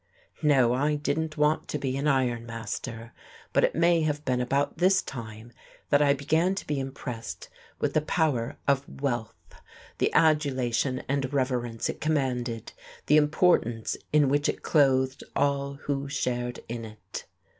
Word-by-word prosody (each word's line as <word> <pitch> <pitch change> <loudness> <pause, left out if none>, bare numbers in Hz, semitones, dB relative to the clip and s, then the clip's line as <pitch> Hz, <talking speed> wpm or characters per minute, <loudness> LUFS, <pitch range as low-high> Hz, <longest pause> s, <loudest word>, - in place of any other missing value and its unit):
No, 135 -6 +4
I 145 +4 +1
didn't 155 +2 -2
want 150 +1 +2
to - - -2
be 130 -2 -2
an 140 +2 -1
iron 125 -4 +1
master. 115 +1 -6 0.4
But - - +3
it - - +2
may 170 0 +4
have 150 -1 -1
been 125 -1 +1
about 140 +5 0
this 190 +2 +5
time 115 -2 -8 0.4
that 145 0 +5
I 140 -1 +4
began 160 +7 +1
to - - -5
be 145 -2 -1
impressed 130 -3 -6 0.3
with - - -1
the 155 - +3
power 150 -7 0
of 140 0 +1
wealth, 120 -5 -3 0.6
the - - +2
adulation 130 -5 +2
and 135 -1 -1
reverence 125 -4 -1
it - - -5
commanded, 125 -7 -1 0.3
the 150 - +5
importance 150 -7 +2 0.2
in 150 -2 +4
which 145 +2 +2
it - - -3
clothed 130 -3 +2
all 140 0 0
who 140 -1 -2
shared 125 -3 -2
in 115 0 -5
it.... 110 -1 -9
140 Hz, 155 wpm, -27 LUFS, 120-150 Hz, 0.6 s, this